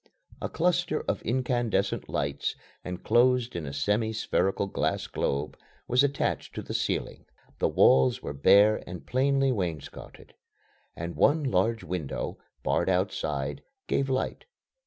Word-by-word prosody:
A - - -2
cluster 175 -2 +1
of - - -2
incandescent 120 -4 0
lights, 70 0 -2 0.3
enclosed 120 +6 +2
in 80 -4 -4
a - - -4
semi 105 +10 0
spherical 100 -2 0
glass 100 - -1
globe, 70 +2 -2 0.3
was 125 +3 +4
attached 140 0 -1
to - - -4
the - - -6
ceiling. - - -2 0.3
The - - +3
walls 65 -1 +4
were 70 - -5
bare 100 +9 +5
and 90 -1 -8
plainly 135 +1 +2
wainscotted, 85 - -5 0.6
and 85 +1 -5
one 150 +2 +3
large 115 -1 +1
window, 85 -6 -4 0.2
barred - - +1
outside, 75 -7 -1 0.2
gave 135 0 0
light. 130 0 -2
105 Hz, 130 wpm, -28 LUFS, 85-130 Hz, 0.6 s, bare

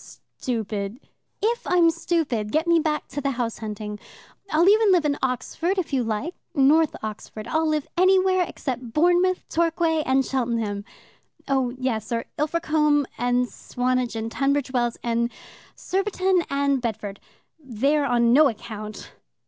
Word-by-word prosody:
"Stupid 215 -2 -3 0.2
" - - -25
"If 470 +2 0
I'm 345 -2 +4
stupid, 275 -12 -1
get 315 +2 +1
me 340 -1 +4
back 305 -1 -1
to 285 +2 -4
the 275 - 0
house 235 -2 -2
hunting. 210 -1 -6 0.5
I'll 330 +4 +3
even 425 0 +5
live 350 -4 +3
in 290 -1 +2
Oxford 320 - -1
if 350 -6 -2
you 260 -2 +2
like 225 +10 -2 0.2
North 300 +3 +4
Oxford. 215 0 -7
I'll 320 0 +1
live 305 -2 0
anywhere 370 0 +4
except 250 -4 -5
Bournemouth, 355 +4 +2
Torquay, 330 -1 +1
and 265 -2 +2
Cheltenham. 230 -6 -2 0.6
Oh 265 -2 +1
yes, 240 -4 -2
or 230 0 -1
Ilfracombe 300 -2 +2
and 245 0 +1
Swanage 250 -1 -2
and 225 0 -3
Tunbridge 280 0 0
Wells 240 -2 0
and 235 0 0 0.5
Surbiton 375 -2 0
and 280 -1 +1
Bedford. 210 -4 -4 0.4
There 275 +2 0
on 240 -3 +3
no 295 +1 +6
account." 215 -1 -8
275 Hz, 145 wpm, -24 LUFS, 235-325 Hz, 0.6 s, no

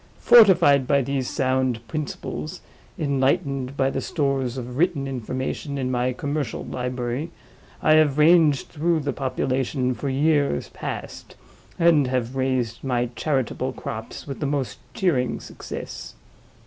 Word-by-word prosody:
Fortified 175 - +6
by 140 -1 +3
these 135 -1 -2
sound 130 -3 0
principles, 140 - -5 0.4
enlightened 140 -1 0
by 135 0 +2
the - - -2
stores 135 -5 -1
of 125 -1 -6
written 160 -2 +1
information 130 +3 -4
in 130 -1 -1
my 125 0 +1
commercial 140 -1 -3
library, 125 +4 -3 0.5
I 155 - +5
have 150 -3 +3
ranged 155 -3 +5
through 165 +1 0
the 140 -1 -2
population 130 0 -1
for 140 +3 -4
years 140 - +1
past, - - -7 0.4
and 165 -5 +4
have 125 0 -2
raised 130 -3 -1
my 125 -2 0
charitable 135 -1 -1
crops - - -7
with 140 - -6
the 145 - -1
most 140 -3 -2 0.2
cheering 140 -10 +1
success. - - -8
135 Hz, 130 wpm, -24 LUFS, 125-145 Hz, 0.5 s, Fortified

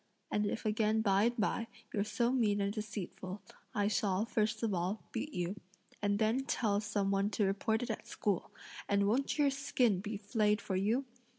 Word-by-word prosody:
And 210 0 +1
if 225 - -3
again 215 0 +2
by 200 -1 +4
and 240 +1 +1
by, 225 +1 0 0.3
you're 200 - +1
so 225 +3 +1
mean 220 -6 +2
and 200 0 0
deceitful, 210 -3 -5 0.4
I 205 -1 +2
shall, 205 -1 +1
first 220 0 0
of 220 -3 +1
all, 185 +4 -1
beat 255 +6 -3
you, 180 -2 -2 0.4
and 205 0 +2
then 220 +4 +2
tell 210 -6 +1
some 205 -2 0
one 200 +1 +2
to 210 -1 +1
report 220 +4 +1
it 245 - -2
at 220 - -6
school, 205 -7 -1 0.4
and 200 0 +3
won't 255 +9 +1
your 290 -2 +4
skin 255 -7 +2
be 205 +2 -4
flayed 210 0 +1
for 195 - -3
you? 220 +8 +1
210 Hz, 190 wpm, -34 LUFS, 200-225 Hz, 0.4 s, by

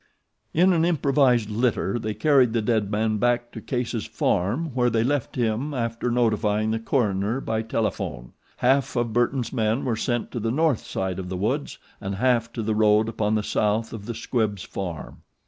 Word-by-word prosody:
In 180 +3 +4
an 165 -2 +2
improvised 135 -9 +2
litter 115 -1 0
they 110 -1 -3
carried 135 -6 +4
the 115 - +1
dead 110 -3 +1
man 110 +1 0
back 120 +1 +1
to 110 - -8
Case's 120 -3 -3
farm 125 - 0
where 125 -1 +2
they 115 -1 +1
left 140 +1 -1
him 120 +5 -1
after 115 0 -2
notifying 110 -3 +1
the 115 - -1
coroner 110 -1 0
by 110 -4 -2
telephone. 105 - -3 0.2
Half 135 +2 +2
of 120 -2 0
Burton's 120 0 0
men 110 +3 0
were 120 -3 0
sent 120 +1 -2
to 120 - -3
the 115 +1 -1
north 150 0 +1
side 95 -1 -3
of 90 -1 -5
the 90 - -3
woods 130 +10 -2 0.2
and 100 -1 -3
half 120 +1 +1
to 115 - -3
the 110 +1 0
road 105 +1 +3
upon 110 -1 0
the 105 - 0
south 105 +2 0
of 105 -2 -8
the 120 - -4
Squibbs' 110 -4 -1
farm. 90 -5 -6
115 Hz, 185 wpm, -24 LUFS, 105-125 Hz, 0.2 s, In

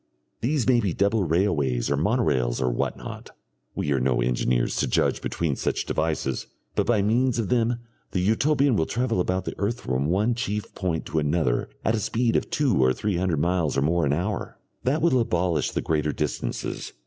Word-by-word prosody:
These 130 0 0
may 125 -2 +5
be 100 -7 0
double 100 0 +2
railways 75 -8 +1
or - - +3
monorails 75 - +1
or 65 -1 +1
what - - -1
not - - -8 0.5
we 75 - -1
are 70 - +2
no 65 -1 +1
engineers - - +1
to - - +1
judge - - +1
between 80 -5 -1
such - - -1
devices 80 -5 -1 0.3
but - - 0
by 110 -4 +3
means 120 +4 +2
of 115 -4 -1
them 120 -1 +2 0.3
the 95 - -1
Utopian 135 +7 +2
will 80 -5 +1
travel 120 -4 0
about 95 +1 -1
the - - -3
earth 115 +4 -1
from 65 +3 -1
one 100 +8 +2
chief 105 -4 -3
point 90 -4 -2
to 80 - -1
another 75 -4 0 0.2
at 110 - +3
a 115 - +1
speed 115 +2 0
of - - 0
two 135 - +2
or 65 0 +4
three 105 +2 -1
hundred 90 -5 0
miles 85 -3 +1
or 70 - +2
more 85 +3 +2
an - - +1
hour. 95 +7 -3 0.3
That 145 +5 +1
will 150 -7 +4
abolish 90 -7 +1
the - - -2
greater 75 -1 0
distances.... 75 -5 -3
90 Hz, 195 wpm, -25 LUFS, 75-115 Hz, 0.5 s, may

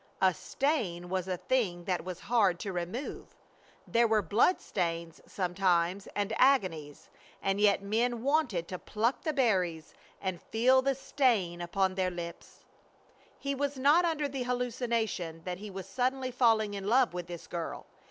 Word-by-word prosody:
A 190 -1 +4
stain 180 - -1
was 185 -1 -2
a 185 -1 -1
thing 190 -7 0
that 180 0 -1
was 185 -2 -6
hard 200 -7 +2
to 195 - -4
remove. 180 +10 -5 0.5
There 235 0 +3
were 220 -2 +2
blood 230 - +3
stains 170 -3 -3
sometimes 180 0 0
and 205 +1 -1
agonies; 180 - +1 0.3
and 195 +1 0
yet 200 -1 +4
men 230 +3 0
wanted 265 - +1
to 185 - -5
pluck 225 +4 -1
the 310 - -1
berries 185 - 0 0.3
and 185 -3 -3
feel 255 +4 +3
the 270 +1 +1
stain 240 -10 +1
upon 190 +2 0
their 185 -1 0
lips! 170 -1 -8 0.8
He 280 0 -2
was 285 0 -2
not 290 +7 +5
under 315 -4 0
the 270 -1 -4
hallucination 235 -9 -2
that 180 0 -4
he 210 +1 -7
was 190 -1 -7
suddenly 255 0 -1
falling 225 -4 +3
in 200 -1 -5
love 245 -1 +4
with 175 -1 -5
this 175 -1 -8
girl. 170 -2 -5
205 Hz, 160 wpm, -30 LUFS, 180-250 Hz, 0.8 s, not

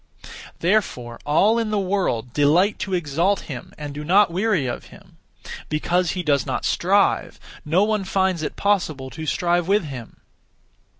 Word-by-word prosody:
Therefore 145 - 0
all 205 +10 +3
in 225 -2 -1
the 215 - 0
world 180 - -1
delight 165 +8 +3
to 190 -1 -2
exalt 175 +4 0
him 130 -5 -8
and 145 -1 -6
do 150 +1 -6
not 190 +4 +4
weary 190 -4 +1
of 120 - -4
him. - - -17 0.5
Because 170 +3 0
he 180 - -2
does 140 -5 +2
not - - -3
strive, - - +1 0.2
no 170 +6 +2
one 215 -1 0
finds 190 -3 0
it 155 - -4
possible 155 -10 -1
to 160 -1 -7
strive 175 +2 +1
with 205 +1 +3
him. 130 -6 -8
175 Hz, 160 wpm, -22 LUFS, 145-195 Hz, 0.5 s, not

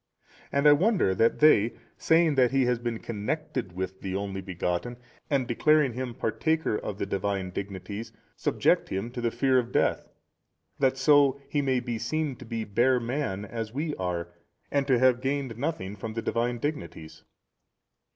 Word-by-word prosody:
And 140 +1 +3
I - - +9
wonder 180 - +2
that 115 +5 +2
they, 115 -7 +5 0.2
saying 160 -1 +3
that 130 -3 +4
he 135 0 +2
has 125 -1 +1
been 120 -1 -3
connected 115 - -4
with 95 +1 -5
the 95 -1 -4
Only 100 -1 -3
Begotten, 95 +5 -3 0.3
and 135 -4 +1
declaring 150 +2 +3
him 125 -1 -4
partaker 160 +3 0
of 105 -1 -4
the - - -2
Divine 100 -1 -2
dignities, 100 +3 -6 0.2
subject - - +1
him 100 +5 -3
to 125 -1 -5
the 120 - +1
fear 130 +2 +2
of 120 0 -4
death, - - +1 0.7
that 135 -1 +2
so 140 0 +4
he 145 - 0
may 130 -2 +1
be 120 -2 -4
seen 155 +1 -2
to 130 - -11
be 115 0 -3
bare 120 +5 +2
man 115 -5 -3
as 115 +2 -6
we 150 +2 -1
are 90 -2 -3 0.4
and 140 -1 +1
to 130 -3 +4
have 125 0 +4
gained 135 -3 -2
nothing 115 -7 -3
from 110 +2 -6
the 115 - -3
Divine 120 +1 0
Dignities. 85 - -5
120 Hz, 170 wpm, -27 LUFS, 100-140 Hz, 0.7 s, I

